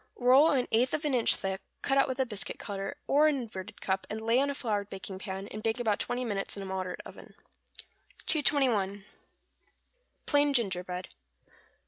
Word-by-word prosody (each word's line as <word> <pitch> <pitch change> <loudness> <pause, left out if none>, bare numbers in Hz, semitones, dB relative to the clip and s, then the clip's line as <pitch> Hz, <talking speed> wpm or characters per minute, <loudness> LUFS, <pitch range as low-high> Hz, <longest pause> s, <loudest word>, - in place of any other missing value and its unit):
Roll 260 +5 +6
an 260 -3 +1
eighth 245 +5 +3
of 305 0 -4
an 290 - +1
inch 240 -3 +5
thick, 190 0 -3 0.2
cut 270 - +1
out 275 - +4
with 260 0 -4
a 265 - +3
biscuit 210 -5 -5
cutter, 195 -1 -5
or 295 +2 +4
an 300 - +3
inverted 215 -5 -7
cup, 190 0 -1
and 215 - -4
lay 230 +3 +2
on 280 - +1
a 280 - -2
floured 205 -6 -2
baking 190 -1 -7
pan, 190 0 -5
and 215 - -7
bake 225 +2 0
about 220 -4 +1
twenty 250 +1 -1
minutes 205 -3 -3
in 200 - -4
a - - -6
moderate 190 -1 -4
oven. - - -12 0.9
221. 235 - +2 1.2
=Plain 290 -1 +3
Gingerbread. 185 -5 0
220 Hz, 180 wpm, -30 LUFS, 195-265 Hz, 1.2 s, Roll